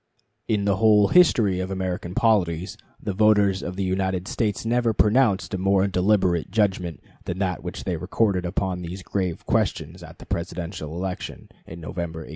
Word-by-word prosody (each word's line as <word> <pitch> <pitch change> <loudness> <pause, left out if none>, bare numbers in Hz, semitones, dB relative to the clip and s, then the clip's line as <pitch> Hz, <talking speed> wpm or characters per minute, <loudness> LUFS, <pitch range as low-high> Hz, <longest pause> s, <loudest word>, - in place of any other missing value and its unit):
In 105 -2 0
the 100 -2 +2
whole 105 -2 +5
history 115 - +4
of 95 0 -3
American 95 -2 -4
polities 95 -5 +1 0.2
the 100 - -4
voters 105 -1 +3
of 90 - -5
the 100 - -2
United 95 0 -1
States 105 -2 -2
never 120 0 +1
pronounced 105 -3 +2
a 95 - -1
more 95 +1 +3
deliberate 95 -3 +1
judgment 95 -5 0 0.3
than 90 - -4
that 95 -2 -1
which 90 0 -6
they 90 -3 -2
recorded 95 +2 0
upon 90 0 -2
these 90 +2 -7
grave 90 -4 -3
questions - - -1
at - - -12
the - - -12
Presidential 85 -2 -5
election 90 +1 -5 0.2
in 85 - -9
November, 80 0 -5
1860. - - -11
95 Hz, 170 wpm, -24 LUFS, 90-105 Hz, 0.3 s, whole